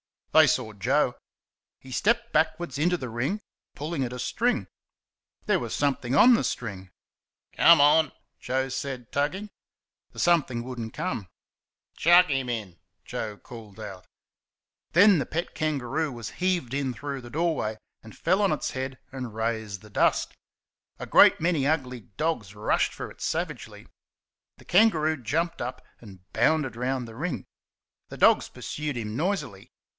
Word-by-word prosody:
They 155 -1 +7
saw 125 -4 0
Joe. 125 +5 +1 0.6
He 130 - -14
stepped 235 - +1
backwards 155 -2 0
into 175 +4 +2
the 130 -6 -6
ring, 130 - -2 0.3
pulling 150 -1 -3
at 125 -1 -4
a - - -5
string. 130 - 0 0.8
There - - +2
was - - -4
something 135 -3 0
on 245 - +8
the 230 - +2
string. 100 -5 -4 0.7
"Come 170 -3 +7
on!" 150 +2 +5 0.3
Joe 130 +1 -1
said, 130 -2 -5
tugging. 185 +9 -1 0.6
The - - -10
"something" 145 -9 +2
would 125 0 -7
n't 110 -1 -5
come. 100 -5 -3 0.7
"Chuck 175 +1 +6
'im 135 -2 0
in!" 105 -8 -5 0.2
Joe 105 -2 -5
called 110 -3 -12
out. 100 -4 -9 0.9
Then 195 0 +7
the 135 - -1
pet 170 +7 -4
kangaroo 150 0 -1
was 115 -2 -7
heaved 180 -9 0
in 135 -2 -1
through 140 +2 -5
the 120 - -11
doorway, 150 -7 -1 0.2
and 110 - -14
fell 185 +5 +2
on 200 -5 +3
its 150 - -3
head 130 0 -4
and 125 -5 -6
raised 110 -4 -3
the 105 - -15
dust. - - +1 0.6
A - - -6
great - - +6
many 160 -5 +1
ugly 130 -5 -1 0.2
dogs 135 - -2
rushed 105 - +1
for - - -7
it - - -16
savagely. - - -4 0.7
The - - -18
kangaroo 160 - +3
jumped 165 +9 -1
up 125 +1 -5
and 95 -5 -13
bounded 135 +1 +1
round 125 0 -2
the 115 - -11
ring. 160 +7 -3 0.6
The - - -10
dogs - - +5
pursued 150 -2 -5
him 110 -2 -4
noisily. 165 - -2
135 Hz, 155 wpm, -26 LUFS, 115-160 Hz, 0.9 s, on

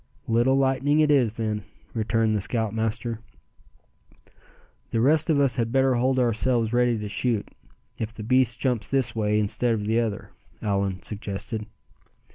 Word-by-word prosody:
"Little 120 +4 +3
lightning 135 +2 +2
it 155 -1 +4
is, 125 -7 +3
then," 110 -2 -2 0.3
returned 110 0 +1
the 105 - 0
scoutmaster. 110 +1 -2 1.7
"The 115 - -1
rest 150 +7 +3
of 150 -3 +3
us 135 -5 +2
had 115 -1 0
better 135 0 +3
hold 130 +2 +1
ourselves 120 -1 +1
ready 120 -1 +3
to 105 -1 -5
shoot, 115 +1 -1 0.5
if 110 -1 -3
the 110 -1 -9
beast 125 +1 +2
jumps 125 -5 -1
this 130 -4 0
way 105 -1 +1
instead 115 +3 +1
of 105 -2 -4
the 110 +2 +2
other," 110 -4 -3 0.3
Allan 100 -2 -1
suggested. 105 +1 -4
115 Hz, 150 wpm, -25 LUFS, 110-130 Hz, 1.7 s, it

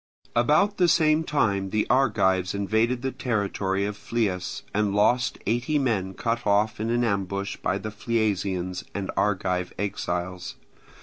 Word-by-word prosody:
About 150 - +3
the 180 - +4
same 155 -1 +4
time 100 -11 0
the 105 +2 +1
Argives 95 -8 +2
invaded 110 +5 0
the 135 - -1
territory 100 -6 -1
of 105 0 -3
Phlius 105 -4 -2
and 105 -1 +1
lost 120 +3 +2
eighty 120 +8 +1
men 100 -9 0
cut 115 -1 -2
off 105 +2 +2
in 110 +1 -2
an 120 +1 +1
ambush 100 -2 -1
by 95 - -1
the 110 +1 -5
Phliasians 100 -5 -1
and 100 -1 -3
Argive 90 -3 0
exiles. 90 -2 -3
105 Hz, 140 wpm, -25 LUFS, 95-120 Hz, -, the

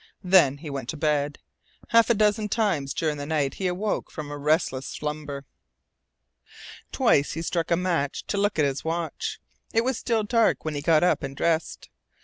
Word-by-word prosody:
Then 180 -7 +5
he 150 0 -8
went 135 -3 -5
to 160 - -4
bed. 145 -1 0 0.5
Half 230 0 +5
a 235 - +4
dozen 210 0 +2
times 190 - 0
during 155 -2 -1
the 145 - -5
night 150 -3 0
he 190 - -2
awoke 195 +4 -2
from 150 -2 -7
a 145 - -5
restless 145 -3 +1
slumber. 150 -2 -5 1.5
Twice 225 - +2
he 165 - -4
struck 170 0 -1
a 170 - +3
match 170 -6 -1
to 205 - -2
look 205 -2 +1
at 150 - +3
his 140 0 -2
watch. 165 0 -3 0.4
It 225 - +4
was 260 -1 -1
still 225 -3 0
dark 225 -3 +2
when 155 - -2
he 145 - -3
got 155 +1 +4
up 180 - +3
and 135 0 -6
dressed. 165 -1 -1
160 Hz, 185 wpm, -25 LUFS, 145-200 Hz, 1.5 s, Then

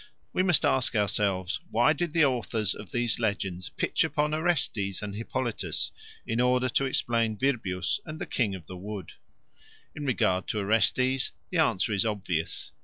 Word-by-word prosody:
We - - +2
must 180 -4 +4
ask 130 -3 +2
ourselves, 100 -3 +1
Why 120 +6 +4
did 170 +1 -2
the 165 -3 +5
author 120 -4 -1 0.2
of 105 - -10
these 120 -3 +1
legends 95 -5 -1
pitch - - +1
upon 150 0 0
Orestes 140 - 0
and 100 -1 -4
Hippolytus 115 +2 -2 0.3
in 115 +1 0
order 125 0 +3
to 135 - +1
explain 115 -4 +1
Virbius 100 -8 0
and 155 -2 -7
the - - -4
King 105 -6 0
of 90 -4 -10
the 90 +3 -8
Wood? 100 -2 -7 0.8
In 150 - -5
regard 95 -8 +1
to - - -2
Orestes, 115 +6 +2 0.2
the 180 - +1
answer 115 - +2
is 100 - +2
obvious. 95 -7 -2
115 Hz, 165 wpm, -28 LUFS, 100-130 Hz, 0.8 s, the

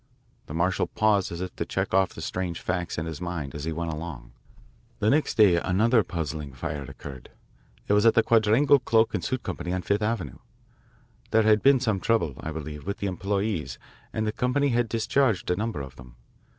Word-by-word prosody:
The 75 - -6
marshal 90 +3 +1
paused 105 -4 +1
as 85 +1 -5
if 90 -1 -5
to - - -1
check - - -3
off 95 0 +2
the - - -7
strange 90 -2 -3
facts 90 -1 -3
in 80 - -2
his 80 0 -6
mind 85 -6 -4
as 75 0 -5
he 80 - -2
went 80 0 -3
along. 75 -7 -7 0.7
"The 105 - +2
next 150 +2 +1
day 100 -6 +6
another 110 +7 +3
puzzling 75 -5 -4
fire 70 +3 -4
occurred. 65 0 -9 0.6
It - - +2
was 105 0 +4
at 115 - +5
the 115 - +5
Quadrangle 115 +6 +4
Cloak 115 -2 +2
and - - -2
Suit 130 -1 -2
Co., - - -3
on 90 +1 -2
Fifth 100 +1 0
Avenue. 105 - -2 0.9
There 110 0 +4
had 110 -1 +4
been 135 -1 +5
some 110 -6 0
trouble, 110 - +1
I - - -5
believe, 75 0 -7
with 100 - -2
the - - -4
employees, 95 - -2 0.3
and 110 - -2
the 110 - 0
company 125 +5 +1
had 120 -2 +1
discharged 115 -3 +1
a - - +2
number 110 -5 -3
of 65 -1 -9
them. 65 -2 -13
95 Hz, 205 wpm, -26 LUFS, 80-110 Hz, 0.9 s, day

